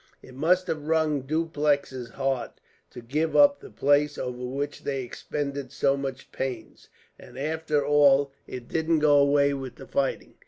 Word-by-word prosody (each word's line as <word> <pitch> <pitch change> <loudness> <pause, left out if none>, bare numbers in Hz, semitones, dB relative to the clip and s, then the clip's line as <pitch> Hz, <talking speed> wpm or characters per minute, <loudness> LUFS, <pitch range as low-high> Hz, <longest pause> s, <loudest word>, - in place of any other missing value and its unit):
"It 130 - -13
must 175 +7 +2
have 155 -4 -4
wrung 160 -3 +1
Dupleix's 145 -5 -1
heart 135 0 -3 0.3
to 120 - -10
give 150 +7 -1
up 285 -1 +6
the - - -12
place 145 +1 +2
over 125 0 -5
which 140 +3 -4
they 135 -2 -2
expended 140 +2 -5
so 135 - +1
much 135 -1 -6
pains, 130 -4 -6 0.3
and 120 - -14
after 150 0 -1
all 145 -1 +4 0.2
it 125 -2 -8
didn't 160 0 +1
do 150 - +4
away 140 0 +4
with 135 -2 -6
the 135 - -11
fighting. 135 +1 -2
140 Hz, 160 wpm, -26 LUFS, 135-150 Hz, 0.3 s, up